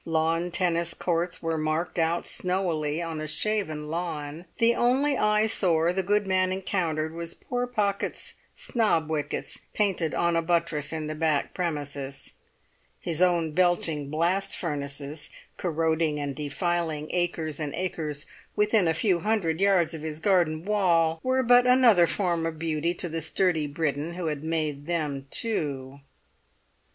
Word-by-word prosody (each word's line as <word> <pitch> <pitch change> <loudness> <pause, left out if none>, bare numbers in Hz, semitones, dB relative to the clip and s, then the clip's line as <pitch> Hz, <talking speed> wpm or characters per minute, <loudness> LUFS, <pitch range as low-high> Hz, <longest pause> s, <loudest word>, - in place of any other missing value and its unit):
Lawn 165 +1 0
tennis 170 -1 0
courts 175 0 -1
were 165 -1 -1
marked 155 +3 -1
out 165 +1 +1
snowily 170 -4 -1
on 165 -2 -4
a 155 - -4
shaven 155 -2 -1
lawn; 160 -1 -4
the 230 +1 +5
only 265 +5 +2
eyesore 210 -7 +2
the 190 - 0
good 205 +2 +1
man 185 -1 +2
encountered 165 -5 -1
was 170 0 -5
poor 245 0 -3
Pocket's 205 -5 -1 0.2
snob 170 -10 0
wickets 145 -2 -3 0.2
painted 190 -6 +1
on 170 0 +2
a 165 - +3
buttress 165 -3 0
in 160 -1 -3
the 155 - -3
back 155 -2 0
premises; 145 -5 -4 0.7
his 170 0 -2
own 170 -3 +3
belching 165 -4 +1
blast 180 +6 0
furnaces, 145 -2 -3 0.3
corroding 160 -2 0
and 140 -1 -3
defiling 155 +1 -2
acres 165 -4 -1
and 150 -2 -2
acres 155 -5 -3 0.3
within 210 -3 +3
a 160 - +2
few 180 0 +2
hundred 190 -5 0
yards 190 -5 +3
of 160 - -5
his 155 0 -5
garden 170 -3 +2
wall, 170 -6 +2
were 260 0 +1
but 245 +1 +6
another 240 -9 +6
form 170 -4 0
of 160 -1 -5
beauty 165 +1 -1
to 175 - -1
the 165 0 -3
sturdy 160 -1 +1
Briton 150 +2 -2
who 180 -1 -4
had 150 -2 -2
made 155 -3 -2
them 150 -5 -2
too. 140 -12 -2
165 Hz, 145 wpm, -27 LUFS, 155-185 Hz, 0.7 s, but